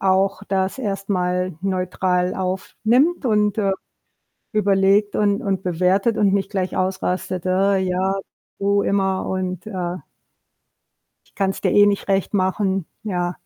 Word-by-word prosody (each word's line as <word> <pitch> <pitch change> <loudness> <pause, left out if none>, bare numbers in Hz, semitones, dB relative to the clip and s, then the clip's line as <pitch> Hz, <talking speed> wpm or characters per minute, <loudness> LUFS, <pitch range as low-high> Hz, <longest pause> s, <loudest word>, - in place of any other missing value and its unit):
auch 190 0 +2
das 190 +2 0
erst 200 -4 -3
mal 180 -1 0
neutral 185 -1 0
aufnimmt 225 - 0
und, 210 -3 +2
äh, 195 -2 +2 0.8
überlegt 200 0 +3
und 205 -1 +1
und 195 -2 -1
bewertet 185 +5 +1
und 200 -2 +3
nicht 195 -1 0
gleich 185 -2 -2
ausrastet: 185 -1 -2
„Äh 195 +2 +2
ja, 190 +1 0 0.4
du 200 0 +2
immer“ 190 -1 0
und, 185 +1 -3
ah 180 -3 -4 1.2
„Ich - - -30
kann's 195 -1 -1
dir - - +1
eh 205 0 +6
nicht 200 0 0
recht 195 +1 0
machen.“ 190 -1 0 0.2
Ja. 180 -4 -2
195 Hz, 135 wpm, -21 LUFS, 185-200 Hz, 1.2 s, eh